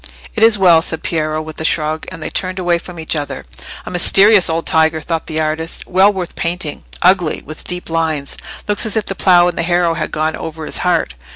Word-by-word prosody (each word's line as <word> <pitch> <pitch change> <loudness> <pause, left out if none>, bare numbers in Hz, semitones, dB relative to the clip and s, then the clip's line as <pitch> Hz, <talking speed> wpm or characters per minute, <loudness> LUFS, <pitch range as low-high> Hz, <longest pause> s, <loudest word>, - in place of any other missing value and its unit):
"It 220 - -3
is 225 -1 +5
well," 175 -4 +5
said 160 -1 -3
Piero, 155 -1 -1
with 155 0 -8
a - - -3
shrug, 155 -1 0
and 165 -3 -8
they - - -4
turned 185 0 -2
away 175 -2 +1
from 175 -1 -10
each 160 0 -1
other. 145 -2 -4 0.4
"A - - -6
mysterious 195 +2 +5
old 165 +1 -1
tiger!" 160 0 +2
thought 165 +1 -4
the 160 -1 -3
artist, 155 +1 -3
"well 190 +3 +4
worth 185 -3 -5
painting. 170 -3 -3 0.2
Ugly—with 175 -4 +1
deep 180 0 -4
lines—looking 165 +6 -2
as 220 - -1
if 215 - 0
the - - -3
plough 175 -2 +4
and 175 - -3
the - - +3
harrow 175 0 +1
had 160 -2 -3
gone 155 +1 -1
over 160 -1 -7
his - - -2
heart. 175 - 0
165 Hz, 210 wpm, -16 LUFS, 160-180 Hz, 0.4 s, is